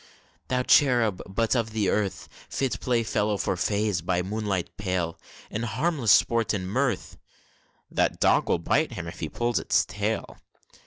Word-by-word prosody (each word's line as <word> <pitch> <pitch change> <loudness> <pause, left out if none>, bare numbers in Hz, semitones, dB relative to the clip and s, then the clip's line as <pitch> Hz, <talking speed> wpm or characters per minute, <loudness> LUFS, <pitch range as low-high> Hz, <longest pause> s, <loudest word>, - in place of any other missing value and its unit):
Thou 125 0 0
cherub 120 -8 +4
but 115 +6 0
of 110 -2 -1
earth; 105 -1 0 0.2
Fit 135 -2 -1
playfellow 110 -4 0
for 95 - -1
Fays, 100 0 0
by 90 +1 0
moonlight 100 -2 -3
pale, 90 -4 -2 0.3
In 110 - -3
harmless 120 - +1
sport 115 -1 +3
and 95 -2 -3
mirth, 120 -1 -1 0.7
(That - - +1
dog - - +3
will - - +3
bite - - 0
him 85 - -5
if 85 - -8
he 80 - -3
pulls 120 +5 0
its - - +2
tail!) 105 +2 -3
105 Hz, 150 wpm, -26 LUFS, 95-120 Hz, 0.7 s, cherub